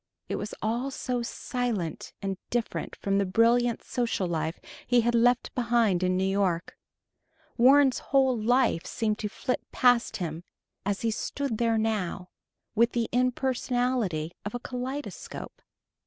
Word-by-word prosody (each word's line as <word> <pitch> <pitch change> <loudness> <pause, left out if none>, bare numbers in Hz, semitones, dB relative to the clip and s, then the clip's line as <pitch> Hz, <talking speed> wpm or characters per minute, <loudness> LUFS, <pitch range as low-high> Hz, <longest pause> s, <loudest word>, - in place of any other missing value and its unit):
It - - -1
was 210 - -5
all 235 +5 0
so 250 -2 -2
silent 235 - -3
and 195 -1 -2
different 240 -2 -2
from 195 0 0
the - - +3
brilliant 235 +4 +3
social 235 -6 -1
life 160 -1 -2 0.3
he 245 0 +4
had 240 +1 +1
left 240 +1 +3
behind 235 -6 +2
in 185 0 +2
New 190 - +1
York. 190 -3 0 0.8
Warren's 265 +2 +5
whole 265 -2 +2
life 235 -5 +2
seemed 215 -1 -1
to 210 - -2
flit 250 +4 -2
past 245 -2 +3
him, 165 -2 -4 0.4
as 200 -1 -1
he 230 - +1
stood 250 +1 -3
there 230 -1 +2
now, 205 -5 -1 0.4
with 230 +2 +3
the 235 -1 0
impersonality 245 - 0
of 205 +3 -5
a - - -2
kaleidoscope. 255 +4 -6
230 Hz, 140 wpm, -28 LUFS, 195-245 Hz, 0.8 s, Warren's